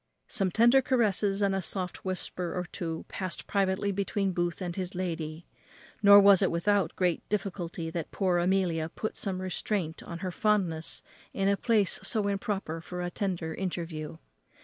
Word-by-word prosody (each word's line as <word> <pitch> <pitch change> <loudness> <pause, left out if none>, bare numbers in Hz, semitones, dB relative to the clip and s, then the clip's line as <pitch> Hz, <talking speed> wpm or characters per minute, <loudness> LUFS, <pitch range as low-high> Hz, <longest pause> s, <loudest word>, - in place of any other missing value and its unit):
Some 195 - 0
tender 235 +7 +5
caresses 210 -5 +1
and 200 -1 +2
a 195 - 0
soft 180 -1 -3
whisper 180 -1 -3
or 180 - 0
two 165 -2 -4
passed 185 -2 -4
privately 195 0 +1
between 195 0 -1
Booth 175 -1 -1
and 175 -3 -4
his 185 -1 -4
lady; 165 -3 -4 0.6
nor 200 -1 +9
was 200 -1 +7
it 190 - +3
without 180 +1 +1
great 180 -3 +1
difficulty 175 -5 -3
that 165 -2 -4
poor 185 -3 +1
Amelia 175 -3 +1
put 215 +5 -4
some 190 -3 -2
restraint 185 -2 -2
on 170 - -7
her 185 - -2
fondness 180 -6 0 0.3
in 195 0 0
a 200 - +4
place 215 -3 +2
so 215 -4 0
improper 195 -5 -2
for 180 +1 -5
a 175 - -3
tender 175 -5 -2
interview. 170 -4 -4
185 Hz, 165 wpm, -29 LUFS, 170-200 Hz, 0.6 s, nor